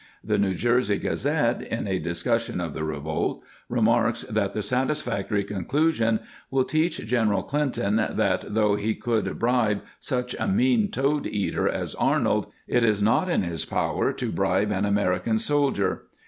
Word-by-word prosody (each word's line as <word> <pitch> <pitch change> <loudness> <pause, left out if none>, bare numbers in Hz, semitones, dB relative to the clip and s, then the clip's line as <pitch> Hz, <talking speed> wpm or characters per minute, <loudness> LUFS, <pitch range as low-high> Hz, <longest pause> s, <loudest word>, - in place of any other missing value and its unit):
* - - -34
The 105 - +3
New 95 -2 +1
Jersey 120 -1 +2
Gazette, 140 -4 0
in 115 -2 -4
a 95 -1 0
discussion 115 +8 -1
of 85 -4 -3
the - - -4
revolt, 80 0 -2 0.3
remarks - - +2
that 100 -2 -1
the 105 - -2
satisfactory 125 -4 0
con 100 -3 -5
clusion 125 -7 +2
" - - -24
will 135 -1 +2
teach 155 0 0
General 110 -3 +1
Clinton 135 -8 0
that, 110 - +1
though 105 -2 +3
he 105 +2 0
could 115 -3 -1
bribe 115 -4 +1 0.2
such 125 -1 -2
a - - -1
mean 225 +1 +3
toad 145 -4 0
eater 105 -2 0
as - - -3
Arnold, - - +1 0.2
it 120 - +2
is 105 -3 +3
not 110 - +2
in 170 - +2
his 85 -4 -2
power - - 0
to - - -3
bribe 100 +3 +1
an 100 0 0
American 100 +1 +1
sol 145 +5 +2
dier." 100 -5 -1
110 Hz, 170 wpm, -25 LUFS, 100-130 Hz, 0.3 s, The